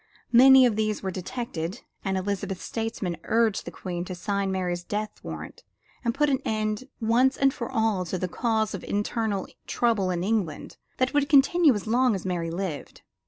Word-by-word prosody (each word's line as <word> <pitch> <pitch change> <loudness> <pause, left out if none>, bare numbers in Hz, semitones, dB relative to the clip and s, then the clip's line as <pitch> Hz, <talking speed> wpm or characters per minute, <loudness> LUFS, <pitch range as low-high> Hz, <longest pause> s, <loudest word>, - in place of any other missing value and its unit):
Many 260 +2 +8
of 235 -4 +2
these 215 -1 -1
were 190 - -2
detected, 185 -1 -5 0.2
and 195 -1 -1
Elizabeth's 195 -1 -3
statesmen 225 -6 -3
urged 225 -2 +1
the - - -4
Queen 175 -2 -5
to 185 - -6
sign 200 +1 -1
Mary's 180 -2 -2
death 210 +3 -4
warrant - - -7 0.4
and 235 -1 0
put 295 +1 +3
an 270 -3 +2
end 215 +2 -1
once 245 +4 +3
and 275 -1 +3
for 235 - -5
all 220 -6 +1
to 180 +2 -3
the 185 - -2
cause 220 +2 0
for 195 - -6
internal 205 -1 -1 0.2
trouble 225 -6 +1
in 175 -1 -1
England 195 -7 -2 0.2
that 255 0 +1
would 290 -1 +2
continue 290 0 +5
as 205 - -4
long 240 +1 +3
as 190 - -6
Mary 175 -3 -2
lived. 170 -3 -5
215 Hz, 180 wpm, -26 LUFS, 185-240 Hz, 0.4 s, Many